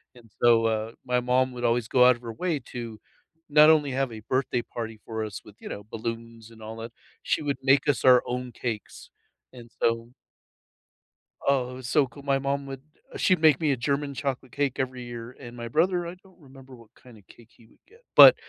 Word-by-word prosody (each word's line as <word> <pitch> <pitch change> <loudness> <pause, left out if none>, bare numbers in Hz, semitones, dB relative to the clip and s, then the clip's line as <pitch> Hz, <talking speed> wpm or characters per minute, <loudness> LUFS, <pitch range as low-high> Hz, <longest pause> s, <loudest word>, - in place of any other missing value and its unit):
And 115 -3 -18
so, 115 -1 +5
uh, 110 0 -1
my 125 -1 +1
mom 125 +1 +1
would 120 -1 -7
always 115 -1 +1
go 125 0 +5
out 125 - +6
of 120 - -17
her 115 - -6
way 165 +4 -1
to 115 -3 -6 0.5
not 150 +1 +7
only 150 -3 +4
have 135 -1 -1
a 110 -1 -8
birthday 130 -2 0
party 115 -2 -7
for 110 -1 -4
us 105 -2 -7
with, 105 - -14
you - - -9
know, 100 - -6
balloons 115 0 -6
and 110 -1 -16
all 110 +1 -8
that, 115 +1 -7 0.3
she - - 0
would 145 -2 -2
make 135 +2 +4
us 145 - +1
our 125 -1 +7
own 125 0 -3
cakes. 115 -3 -6 0.4
And 120 -2 -13
so 115 0 +1 1.4
Oh, 130 -3 +2
it - - -8
was 130 -1 -7
so 145 -1 +3
cool. 135 +4 -14
My 140 -1 +1
mom 140 +1 -2
would 135 -1 -7 0.4
she'd 185 -3 +2
make 155 -4 +5
me 155 -3 +1
a 135 - 0
German 140 +4 -1
chocolate 130 -2 -4
cake 140 -1 0
every 130 -1 -3
year, 120 0 -8
and 120 -2 -10
my 120 0 -5
brother, 175 +6 +1
I 175 - -7
don't 185 0 -23
remember 135 -3 -14
what 115 -2 -19
kinda 120 -4 -16
cake 115 -1 -18
he 115 - -22
would - - -26
get, 455 +6 -22
but - - +11
125 Hz, 220 wpm, -26 LUFS, 115-140 Hz, 1.4 s, but